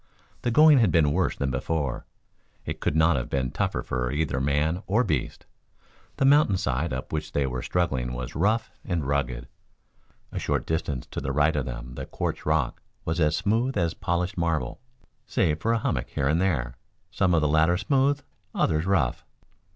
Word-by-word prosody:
The 120 - 0
going 150 +3 +7
had 110 -7 +4
been 75 -3 +3
worse 95 +1 +1
than 70 -1 -1
before. 70 +1 -2 0.6
It - - -4
could - - -1
not 80 -1 +4
have - - -3
been 65 -2 -1
tougher 60 - -1
for 60 0 -2
either 75 -2 -1
man 75 +6 +1
or 110 +6 +3
beast. 75 - -2 0.7
The 135 - +2
mountain 140 -8 +5
side 70 0 -1
up 65 +3 -5
which 75 0 -3
they 70 - +1
were 65 -2 -3
struggling 65 -9 -1
was 60 0 -5
rough 110 +8 +1
and 85 -6 -2
rugged. 65 -3 -1 0.8
A - - -3
short - - -1
distance 75 -5 -2
to - - -4
the 65 - -2
right 75 +3 +2
of 70 -4 -1
them - - -6
the - - -6
quartz - - -4
rock 75 -6 0 0.2
was 80 +2 -1
as 75 -1 +3
smooth 115 +7 0
as 85 -1 +1
polished 90 +1 -2
marble 80 - -1 0.5
save 75 0 +1
for 115 +7 0
a 115 - +3
hummock - - -2
here 70 - -1
and 80 +5 +2
there, 65 -10 0 0.3
some 90 -3 +2
of 80 - +3
the 75 - +2
latter 80 +4 +3
smooth, 140 - +2 0.3
others 80 +3 +1
rough. 80 -11 +1
80 Hz, 185 wpm, -26 LUFS, 65-90 Hz, 0.8 s, going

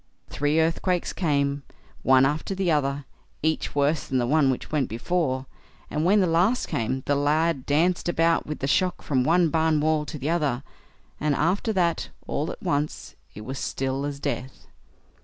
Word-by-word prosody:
Three 145 +2 +1
earthquakes 165 +2 0
came, 140 -4 0 0.4
one 130 0 +5
after 150 +7 -1
the 190 -3 +1
other, 140 -2 0 0.4
each 160 -1 -1
worse 145 +2 +2
than 130 - 0
the 120 - +1
one 145 +1 +3
which 130 - -3
went 150 -4 0
before, 130 +2 -1 0.5
and 150 - -1
when 200 +4 +4
the - - +3
last 180 +9 +2
came, 130 +3 -2
the 145 - +1
lad 145 0 +1
danced 175 +5 +2
about 165 0 +2
with 150 - -5
the 135 - 0
shock 180 +5 +1
from 130 -3 +1
one 165 +4 +3
barn 160 -1 +2
wall 155 0 +1
to 155 - -6
the 145 +3 -2
other; 145 -7 0 0.6
and 150 -1 +1
after 185 - +1
that, 170 -4 0 0.2
all 150 - -2
at - - -11
once, 145 +1 -2 0.2
it 105 - -8
was 130 +5 -6
still 135 +1 -2
as 145 -1 -4
death. 130 -2 -4
150 Hz, 175 wpm, -25 LUFS, 140-165 Hz, 0.6 s, one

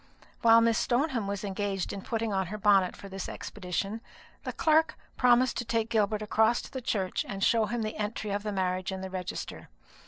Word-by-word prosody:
While 230 0 +7
Miss 230 -1 +3
Stoneham 245 -4 0
was 200 0 -3
engaged 195 -1 -2
in 200 - -5
putting 225 0 -2
on 190 -2 0
her 210 +4 -5
bonnet 200 -3 +4
for 200 - -10
this 195 0 -6
expedition, 200 +3 -4 0.4
the - - -2
clerk 315 0 +2 0.2
proposed 250 0 +4
to 240 - -3
take 225 0 -1
Gilbert 215 -1 +1
across 220 +2 +3
to - - -11
the 260 -2 -5
church 195 -6 -1
and 195 -1 -3
show 225 -2 +3
him 235 +1 -2
the 215 - -4
entry 210 0 -3
of 200 +1 -1
the 210 0 -3
marriage 185 -1 -1
in 190 0 -5
the 190 0 -6
register. 185 -2 -5
210 Hz, 200 wpm, -29 LUFS, 195-230 Hz, 0.4 s, While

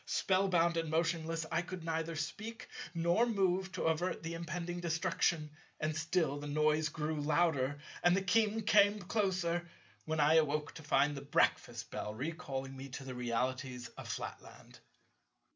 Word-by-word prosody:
Spell 190 +1 +2
bound 170 -2 +3
and 165 -1 -1
motionless, 165 0 0
I - - +2
could 185 -1 -7
neither 165 0 -2
speak 215 +9 -5 0.3
nor 170 +8 +3
move 190 -3 +1
to - - -3
avert 165 +2 0
the 165 +1 -4
impending 170 +1 -4
destruction; 165 -2 0 0.3
and 155 0 -1
still 160 -2 0
the 145 - -6
noise 155 +1 +2
grew 155 0 -2
louder, 145 -3 +2 0.2
and 175 +1 +5
the 195 - 0
King 220 +2 +2
came 205 0 +5
closer, 180 -4 0 0.4
when 155 0 -1
I 150 +2 +6
awoke 150 -1 +1
to 165 - -9
find 145 0 +3
the 140 - -5
breakfast 120 -5 +1
bell 105 - -4
recalling 135 -1 -4
me 135 +1 -8
to 135 +1 -7
the 130 -1 -6
realities 125 +1 -2
of - - -10
Flatland. - - -7
165 Hz, 160 wpm, -34 LUFS, 145-175 Hz, 0.4 s, I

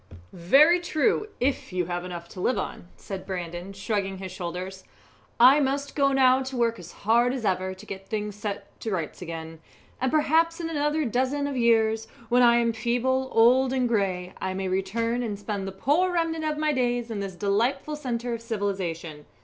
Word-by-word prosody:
"Very 280 - +5
true, 350 +5 +1
if 255 -3 -1
you 180 -1 -1
have 175 0 -3
enough 175 -1 -7
to 185 - -8
live 245 +3 +1
on," 190 - -5
said 195 -2 -7
Brandon, 175 0 -5
shrugging 195 -1 -2
his 190 -1 -7
shoulders. 185 +1 -6 0.6
"I 260 +5 +8
must 280 0 -1
go 275 -1 +3
now 260 -1 +4
to 265 -1 -5
work 230 -1 +1
as - - -10
hard 235 +4 +2
as 245 -4 -4
ever 185 -1 0
to 190 +3 -13
get 195 -1 -8
things 210 -1 -3
set 205 -1 -6
to 225 - -4
rights 175 -6 -3
again, 165 -2 -7 0.4
and 260 - +1
perhaps 320 +2 +2
in 330 -1 -3
another 295 0 0
dozen 260 +4 0
of 285 -1 -3
years, 225 -2 +2 0.2
when 245 +1 +4
I 235 -1 +6
am 235 -1 +2
feeble, 245 +3 0
old, 250 +3 +5
and 255 -2 +1
grey, 190 -5 -1
I 190 0 -2
may 190 0 -2
return 230 +6 -1
and 215 -4 -3
spend 205 -1 -4
the - - -4
poor 295 - +1
remnant 330 -2 -1
of 305 -1 -1
my 305 0 +1
days 245 -2 0
in 215 - -3
this 195 -2 -5
delightful 235 +10 0
centre 245 -4 -3
of 230 - -4
civilization. 185 -9 -4
230 Hz, 190 wpm, -26 LUFS, 190-265 Hz, 0.6 s, I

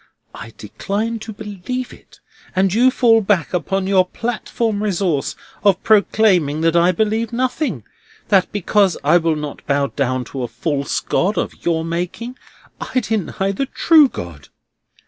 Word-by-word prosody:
I 115 - -9
decline 210 - -3
to 220 +1 -8
believe 210 +5 -6
it, - - -19 0.4
and 190 0 +2
you 245 +4 +5
fall 230 -3 +4
back 190 -6 0
upon 190 +2 -1
your 190 -1 +4
platform 225 +1 -3
resource 185 -8 -1 0.3
of 200 -3 +3
proclaiming 195 -8 +3
that 165 0 +2
I 170 +1 +5
believe 220 +4 -1
nothing; 250 - -2 0.5
that 190 -2 +3
because 205 -1 +1
I 175 - +5
will 165 -2 +1
not 150 -1 -6
bow 140 0 +2
down 130 -2 0
to 135 - -4
a 120 - -2
false 140 +1 -2
God 200 +4 0
of - - -3
your 165 -1 0
making, 180 +9 -4 0.6
I - - +5
deny 195 -3 -2
the 265 +8 -2
true 310 -1 +5
God! 80 - -8
195 Hz, 150 wpm, -19 LUFS, 165-220 Hz, 0.6 s, you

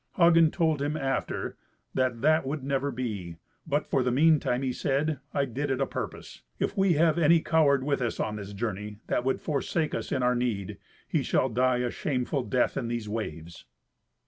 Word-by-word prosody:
Hagen 165 -2 +6
told 160 -4 +1
him, 145 +2 -1
after, 135 -2 -2 0.4
that 130 -3 0
that 155 +1 +4
would 140 +1 -4
never 140 0 0
be, 105 -10 -4 0.3
but 145 0 0
for 135 - +1
the 125 - +1
meantime 135 -2 +3
he 130 -1 -1
said, 145 +2 0
"I 140 -1 +1
did 140 +3 -3
it 135 -1 0
a 135 - +2
purpose. 90 - -6 0.2
If - - -1
we 195 -3 +3
have 160 +1 +3
any 170 +1 +5
coward 150 -5 +3
with 140 -1 0
us 120 -2 -2
on 105 - -1
this 100 0 -7
journey, 105 0 -4
that - - 0
would 130 +1 0
forsake 155 +2 -1
us - - -4
in 130 -3 0
our 125 0 +3
need, 105 -5 -2 0.3
he - - +1
shall 130 - +1
die 125 +2 +2
a 120 - -2
shameful 135 0 -1
death 125 0 0
in 120 - -2
these 115 -2 -3
waves." 85 -7 -6
130 Hz, 195 wpm, -28 LUFS, 120-150 Hz, 0.4 s, Hagen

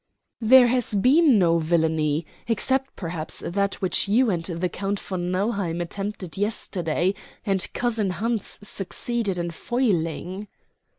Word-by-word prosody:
"There 250 +3 +7
has 240 -3 +1
been 265 - +5
no 170 -3 +3
villany 160 -1 +1 0.2
except, 265 +4 0
perhaps, 165 -3 -3
that 200 +2 0
which 185 - +1
you 225 +3 +3
and 170 -3 -1
the 170 +1 -2
Count 195 +2 -3
von 180 -2 -4
Nauheim 185 -2 -1
attempted 195 0 -5
yesterday, 185 -4 0 0.3
and 195 -3 +1
cousin 225 -5 0
Hans 225 +4 -2
succeeded 205 +1 -2
in 170 0 -2
foiling." 185 - -1
195 Hz, 125 wpm, -24 LUFS, 170-225 Hz, 0.3 s, There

